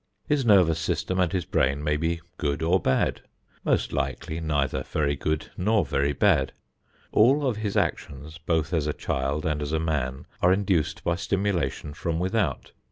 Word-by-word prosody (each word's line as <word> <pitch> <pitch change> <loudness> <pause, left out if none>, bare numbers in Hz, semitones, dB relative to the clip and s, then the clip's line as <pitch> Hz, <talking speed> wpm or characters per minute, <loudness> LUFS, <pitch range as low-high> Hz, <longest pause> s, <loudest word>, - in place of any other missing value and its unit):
His 145 -2 +2
nervous 90 -8 +5
system 90 +3 -1
and 90 -2 +2
his 90 -3 -1
brain 70 -5 +1
may 75 0 +1
be 85 +2 -1 0.2
good 75 +2 -1
or 90 +4 +3
bad 65 - +1 0.4
most - - +1
likely 70 +3 -2
neither 70 -4 0
very 70 +1 -1
good 75 +2 -2
nor 105 -1 +2
very 70 +1 +1
bad. 75 -2 +2 0.6
All 135 +7 +4
of 125 -5 0
his 105 -2 -2
actions 75 +3 -2
both 80 0 -1
as 80 -3 +1
a 75 - 0
child 70 +3 -2
and 75 -1 -1
as 75 +1 -3
a 80 - +2
man 70 -5 -2 0.2
are 90 - +5
induced 95 -5 +1
by 85 0 0
stimulation 85 -5 -1
from 80 +2 -2
without. 95 -4 -1
80 Hz, 170 wpm, -26 LUFS, 75-95 Hz, 0.6 s, nervous